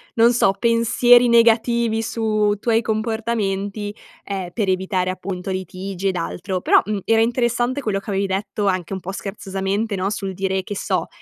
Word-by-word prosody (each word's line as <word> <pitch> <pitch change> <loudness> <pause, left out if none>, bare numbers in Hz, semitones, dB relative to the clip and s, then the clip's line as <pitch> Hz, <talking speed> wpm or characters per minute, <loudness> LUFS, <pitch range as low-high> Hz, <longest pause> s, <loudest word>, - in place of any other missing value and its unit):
non 230 +1 +5
so 215 -5 +3
pensieri 240 +1 +4
negativi 230 -1 +3
su 215 -2 0
tuoi 230 0 +2
comportamenti, 215 -2 -2 0.3
ehm, 190 -3 -5
per 205 -4 -1
evitare 185 0 0
appunto 185 0 -5
litigi 190 +1 -3
ed 185 - -2
altro 180 +2 -3
però, - - +5
mhmm, 210 0 -2
era 225 0 +3
interessante 240 +3 0
quello 210 -5 -1
che 205 - -11
avevi 195 0 0
detto 200 +2 -2
anche 185 -1 -1
un 190 - -3
po' 185 +1 -6
scherzosamente 195 +1 -3
no? 190 +1 -1
Sul 195 -2 -4
dire 190 0 -1
che 205 - -6
so, - - -1
205 Hz, 165 wpm, -21 LUFS, 190-230 Hz, 0.3 s, non